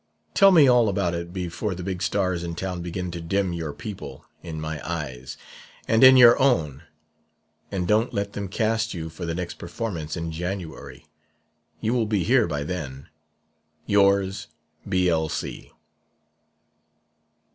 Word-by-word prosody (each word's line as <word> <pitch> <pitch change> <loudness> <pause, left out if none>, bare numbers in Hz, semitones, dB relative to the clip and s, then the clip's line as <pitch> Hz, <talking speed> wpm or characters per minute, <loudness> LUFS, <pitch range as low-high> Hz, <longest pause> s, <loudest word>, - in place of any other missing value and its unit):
Tell 195 - +7
me 160 -6 +7
all 120 -3 +5
about 95 -3 0
it 85 0 -5
before 90 +2 -3
the 90 - -7
big 90 -1 -4
stars 95 -3 0
in 85 -1 -4
town 90 0 -4
begin 90 +1 -4
to 85 0 -6
dim 95 +2 -1
your 80 -3 -4
people 75 -3 -8 0.2
in 80 -2 -6
my 80 -1 -5
eyes 65 -7 -5 0.5
and 115 +2 +3
in 130 0 +9
your 120 +1 +7
own; 80 - +2 0.9
and 90 -3 -2
don't 110 +3 +2
let 100 -2 -3
them 100 -1 -4
cast 110 +2 -1
you 80 -1 -5
for 85 +2 -7
the 85 - -2
next 90 -1 -5
performance 85 -5 -5
in 85 -1 -4
January. 90 0 -6 0.8
You 110 - 0
will 120 -3 +1
be 105 -4 0
here 125 -1 +3
by 75 -3 -3
then. 70 -5 -6 0.8
"Yours, 100 -1 +2 0.4
"B.L.C." 90 -4 -1
90 Hz, 145 wpm, -24 LUFS, 80-105 Hz, 0.9 s, in